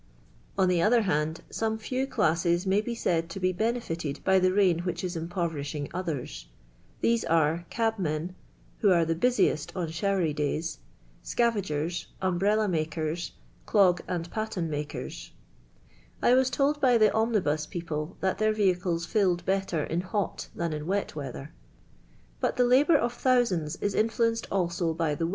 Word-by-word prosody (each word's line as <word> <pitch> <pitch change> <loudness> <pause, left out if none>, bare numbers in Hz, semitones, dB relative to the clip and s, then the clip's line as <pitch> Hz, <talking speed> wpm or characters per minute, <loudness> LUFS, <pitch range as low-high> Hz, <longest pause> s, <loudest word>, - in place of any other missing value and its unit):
On 190 -1 +4
ilie 175 -2 +2
other 230 +4 +4
hind, 160 -3 -1 0.2
>ome 220 0 +1
few 255 +4 -2
classes 175 - +1
may 195 +2 +3
be 235 +2 -4
Slid 165 -7 0
to 195 - -6
h' 185 -1 0
liMH 230 +5 0
iited 165 -4 -4
by 190 0 +4
the 185 0 +3
rain 185 -4 +3
which 180 +1 -3
is 180 -1 -3
im 165 +1 -4
jM)v»'ri 170 -4 -2
!iin;f 145 0 -5
iith' 180 0 -3
r. 125 - -6 0.2
*: - - -32
these 230 -1 +2
are 165 +1 +1
cabmen 185 -8 -1 0.5
(who 205 - +4
are 170 -3 +4
the 165 - +1
l.ii 245 +10 +3
:"Si 150 - -7
on 175 -4 -2
ah^i.r. 195 +5 0
y,/ 165 -4 +1
days), 150 - -2 0.4
scavairers, 180 -8 -1
umhrella 200 +4 +1
mak 160 -3 -2
I. 160 +6 -4
«i«»u' 185 -3 +6
and 175 -1 -3
patien 210 -7 -3
maker.'. 150 0 -4 1.1
1 245 - +4
was 260 0 +3
told 290 +2 +1
by 250 -3 +5
thf 215 -2 +5
i»iinil):i"j 185 -9 0
pi'')])le 155 0 -5
that 190 0 0
their 215 0 +3
vehicles 180 -5 +1
tilled 180 -3 +1
belter 190 -5 0
in 170 +2 -1
li'i: 190 +1 -2
t - - -6
.an 170 -2 -1
in 150 +1 -5
wot 200 -2 -1
weather. 135 - -7 0.9
But - - -1
til" 250 - +4
labour 280 +6 +5
of 240 -2 -1
thousands 235 - +1
is 205 - -2
influenced 230 +1 +1
also 170 -3 0
by 165 -2 0
til. 165 +3 -1
180 Hz, 175 wpm, -28 LUFS, 165-215 Hz, 1.1 s, i«»u